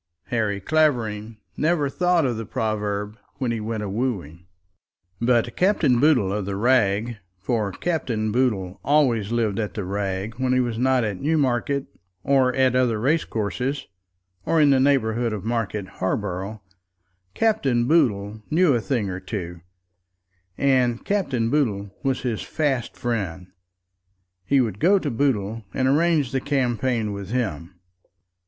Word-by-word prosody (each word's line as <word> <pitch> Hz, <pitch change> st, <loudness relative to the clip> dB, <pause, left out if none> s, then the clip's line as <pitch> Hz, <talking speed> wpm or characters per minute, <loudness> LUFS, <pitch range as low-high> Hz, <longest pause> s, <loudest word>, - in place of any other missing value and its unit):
Harry 110 Hz, -5 st, 0 dB
Clavering 115 Hz, -6 st, 0 dB, 0.2 s
never 155 Hz, -2 st, +1 dB
thought 175 Hz, +2 st, +2 dB
of 125 Hz, -3 st, 0 dB
the 115 Hz, -, -4 dB
proverb 105 Hz, 0 st, -3 dB, 0.2 s
when 125 Hz, -3 st, -2 dB
he 115 Hz, -, -2 dB
went 110 Hz, 0 st, -3 dB
a -, -, -3 dB
wooing. 95 Hz, -, -3 dB, 0.7 s
But 120 Hz, -1 st, +2 dB
Captain 180 Hz, -, +3 dB
Boodle 125 Hz, -10 st, +3 dB
of 105 Hz, -2 st, -2 dB
the 100 Hz, 0 st, -3 dB
Rag, 115 Hz, 0 st, +2 dB, 0.2 s
for 105 Hz, +1 st, -1 dB
Captain 115 Hz, -, -2 dB
Boodle 105 Hz, -7 st, 0 dB
always 125 Hz, -8 st, +2 dB
lived 115 Hz, -4 st, 0 dB
at 105 Hz, -2 st, -3 dB
the 105 Hz, -, -3 dB
Rag 100 Hz, +3 st, -3 dB
when 130 Hz, -1 st, +1 dB
he 130 Hz, -, +3 dB
was 120 Hz, -3 st, -1 dB
not 130 Hz, -1 st, +3 dB
at 105 Hz, -4 st, -3 dB
Newmarket, 140 Hz, -2 st, +1 dB, 0.4 s
or 135 Hz, -2 st, +3 dB
at 130 Hz, -1 st, +3 dB
other 125 Hz, -4 st, +2 dB
racecourses, 130 Hz, -, -1 dB, 0.6 s
or 165 Hz, -, +2 dB
in 145 Hz, -2 st, +5 dB
the 135 Hz, -, +4 dB
neighbourhood 120 Hz, -4 st, +2 dB
of 105 Hz, -1 st, -5 dB
Market 110 Hz, -4 st, -2 dB
Harborough, 95 Hz, +2 st, -3 dB, 0.7 s
Captain 140 Hz, -, +2 dB
Boodle 110 Hz, -9 st, +1 dB
knew 165 Hz, -1 st, +4 dB
a 120 Hz, -, +1 dB
thing 115 Hz, -4 st, -1 dB
or 95 Hz, -1 st, -4 dB
two, 90 Hz, -3 st, -6 dB, 1.0 s
and 125 Hz, -4 st, +2 dB
Captain 135 Hz, -, 0 dB
Boodle 105 Hz, -9 st, 0 dB
was 135 Hz, -2 st, -1 dB
his 120 Hz, -4 st, -2 dB
fast 140 Hz, -6 st, -2 dB
friend. 95 Hz, -7 st, -3 dB, 0.9 s
He 140 Hz, +5 st, +3 dB
would 110 Hz, -5 st, -2 dB
go 195 Hz, +5 st, +5 dB
to 150 Hz, -7 st, -2 dB
Boodle 115 Hz, -4 st, 0 dB
and 130 Hz, -, +1 dB
arrange 150 Hz, -1 st, +2 dB
the 130 Hz, -1 st, -1 dB
campaign 125 Hz, -5 st, 0 dB
with 100 Hz, -1 st, -7 dB
him. 95 Hz, -, -3 dB
120 Hz, 145 wpm, -23 LUFS, 105-135 Hz, 1.0 s, in